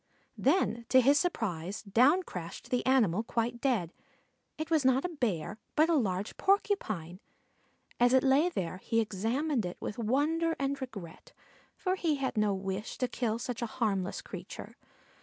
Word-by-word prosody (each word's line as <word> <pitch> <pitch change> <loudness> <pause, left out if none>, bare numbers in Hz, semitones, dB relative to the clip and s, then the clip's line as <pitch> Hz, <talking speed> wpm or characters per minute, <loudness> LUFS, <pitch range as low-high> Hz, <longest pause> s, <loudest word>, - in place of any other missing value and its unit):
Then 260 -7 +1
to 260 - +7
his 280 +4 +5
surprise 200 - -2
down 255 - +4
crashed 180 - -8
the 250 - +1
animal 220 -8 +3
quite 235 +1 -2
dead; 215 - 0 0.6
it 315 +1 -5
was 315 -3 +3
not 260 +2 +3
a - - -1
Bear, 220 - -2 0.2
but 315 +2 +4
a - - +4
large 200 -6 -1
Porcupine. 215 - 0 0.8
As 245 0 +5
it 260 0 +5
lay 280 +6 +4
there 185 - -3
he 225 +4 0
examined 230 +6 0
it 180 -1 -5
with 215 - -5
wonder 305 +8 +1
and 275 0 -2
regret, 200 -10 -8 0.4
for 370 - -1
he 335 -5 +1
had 270 -2 -2
no 210 -1 +2
wish 195 +2 -4
to 250 - 0
kill 230 -2 -1
such 240 0 -4
a 235 - -1
harmless 195 -6 -1
creature. - - -8
240 Hz, 160 wpm, -31 LUFS, 200-280 Hz, 0.8 s, to